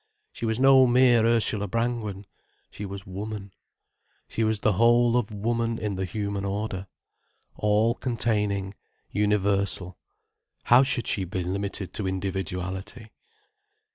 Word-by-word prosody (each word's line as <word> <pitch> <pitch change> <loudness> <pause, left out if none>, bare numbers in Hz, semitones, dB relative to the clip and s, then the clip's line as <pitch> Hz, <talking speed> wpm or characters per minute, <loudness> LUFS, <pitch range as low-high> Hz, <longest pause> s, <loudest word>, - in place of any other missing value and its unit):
She 115 - -4
was 110 +1 -1
no 135 -1 +7
mere 120 -2 +5
Ursula 110 -3 +1
Brangwen. 115 -2 -2 0.5
She 105 - -6
was 100 0 -8
Woman, 100 +1 -6 0.7
she 115 - -2
was 110 -1 0
the 110 - +3
whole 120 +3 +4
of 120 -3 +1
Woman 115 +2 -1
in 105 -2 -3
the 95 0 -2
human 100 +1 -3
order. 100 -1 -3 0.7
All 105 +2 +2
containing, 105 -6 -1 0.4
universal, 100 -3 0 0.6
how 120 +2 +6
should 130 -3 0
she 95 - 0
be 90 0 -3
limited 100 +1 -4
to 100 - -3
individuality? 95 +3 -4
105 Hz, 125 wpm, -26 LUFS, 95-115 Hz, 0.7 s, no